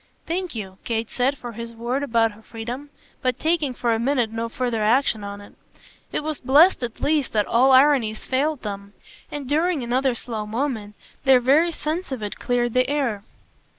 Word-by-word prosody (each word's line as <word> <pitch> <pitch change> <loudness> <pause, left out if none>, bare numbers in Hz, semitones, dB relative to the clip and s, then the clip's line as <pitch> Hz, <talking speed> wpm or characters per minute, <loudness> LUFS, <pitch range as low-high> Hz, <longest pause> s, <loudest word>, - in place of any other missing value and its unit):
"Thank 350 -2 -3
you!" 190 -3 -7
Kate 225 -1 -2
said 265 +3 +1
for 245 -2 -7
his 230 +1 -7
word 240 +4 -2
about 230 -5 +2
her 210 +1 -16
freedom, 240 +6 -7 0.3
but 255 -2 0
taking 315 -4 +1
for 240 -1 0
the 225 - 0
minute 245 -2 +1
no 230 +1 -3
further 240 -2 -2
action 220 0 +2
on 200 0 -6
it. 205 - -14 0.6
It - - -2
was 310 -1 -3
blest 295 +8 +5
at 235 -2 -5
least 295 -3 +1
that 210 -2 +2
all 255 +3 +4
ironies 260 -5 +4
failed 285 +2 0
them, 200 -1 -6 0.4
and 290 -3 -6
during 315 0 +1
another 255 +1 +1
slow 220 -3 -5
moment 220 -3 -3 0.3
their 265 -2 +6
very 290 +8 +4
sense 320 +2 -4
of 250 -5 -4
it 205 - -5
cleared 240 -1 0
the 255 +1 +2
air. 270 -8 0
245 Hz, 185 wpm, -23 LUFS, 225-285 Hz, 0.6 s, their